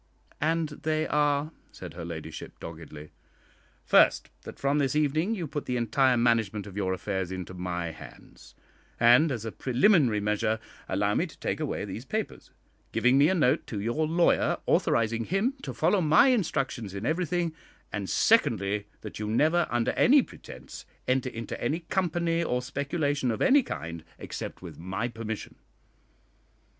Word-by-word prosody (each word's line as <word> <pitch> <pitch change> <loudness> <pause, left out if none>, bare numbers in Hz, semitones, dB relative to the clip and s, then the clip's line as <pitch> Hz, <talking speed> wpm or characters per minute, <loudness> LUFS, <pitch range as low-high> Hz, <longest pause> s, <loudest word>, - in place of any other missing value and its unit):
"And 160 +1 +1
they 155 +1 -1
are?" 145 0 +1 0.2
said 90 -3 -9
her 85 0 -7
ladyship, 85 -2 -8
doggedly. 80 -2 -9 0.7
"First, - - +4
that - - -9
from 140 +2 +1
this 140 0 0
evening 155 +8 +1
you 180 -5 -3
put 145 0 -5
the 125 - -1
entire 125 +2 +2
management 115 -4 +1
of 100 -2 -10
your 95 -2 -1
affairs 95 -1 -3
into 95 -1 -6
my 90 -2 -3
hands, - - -14 0.4
and, 125 +7 +6
as 115 -4 -4
a 115 - -3
preliminary 130 - +3
measure, 105 +1 0 0.3
allow - - +1
me - - +1
to - - -16
take - - -2
away - - -2
these - - -6
papers, - - -4 0.4
giving 125 +2 +3
me 145 +3 +5
a 190 - +2
note 140 -7 +2
to 105 - -4
your 120 +9 0
lawyer 170 +2 +2
authorising 115 0 +1
him 210 +8 0
to - - -5
follow 180 +5 +2
my 155 - +5
instructions 135 - -1
in 100 +3 -4
everything; 170 +1 0 0.4
and, 100 -2 -3
secondly, 105 - +2
that - - -8
you 105 - -3
never, 155 +10 +2
under 120 -1 +1
any 275 +1 +5
pretence, 65 - -11 0.2
enter 130 0 +1
into 115 -1 -6
any 160 +4 0
company 170 -1 0
or 125 -5 -1
speculation 140 +1 -1
of 110 - -1
any 280 +2 +5
kind 85 - -6
except - - -7
with - - -9
my 95 +7 -3
permission." 110 -2 -6
125 Hz, 160 wpm, -28 LUFS, 105-160 Hz, 0.7 s, and